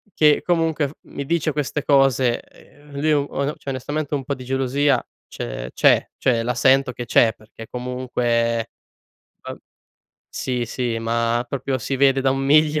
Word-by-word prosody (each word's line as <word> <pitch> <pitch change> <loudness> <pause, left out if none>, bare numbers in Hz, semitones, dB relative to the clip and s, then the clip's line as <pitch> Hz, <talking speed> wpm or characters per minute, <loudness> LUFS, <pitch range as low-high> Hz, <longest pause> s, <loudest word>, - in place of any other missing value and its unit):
che 150 -1 +4
comunque 165 -4 +1
f - - -10
mi 140 - -7
dice 165 +1 0
queste 145 0 -2
cose, 135 -4 +3
ehm, 145 0 -20
lui 155 +2 +2
on 145 0 0
cioè - - -8
onestamente 145 +3 -3
un 140 - -3
po' 140 - -2
di 130 - -8
gelosia 135 +1 +1 0.2
ce - - -6
c'è, - - +4
cioè 120 -3 +1
la 120 +2 -2
sento 130 +1 +3
che 120 - -6
c'è 115 -1 +4
perché 110 +1 -13
comunque, 120 -2 -1 0.7
vab - - -7 0.7
sì, 125 -2 -2
sì 120 0 -3
ma 115 +1 0
proprio 135 0 -2
si 135 +3 -3
vede 135 0 +4
da 135 0 +2
un 135 - 0
miglio! 150 +2 +3
135 Hz, 165 wpm, -22 LUFS, 120-145 Hz, 0.7 s, che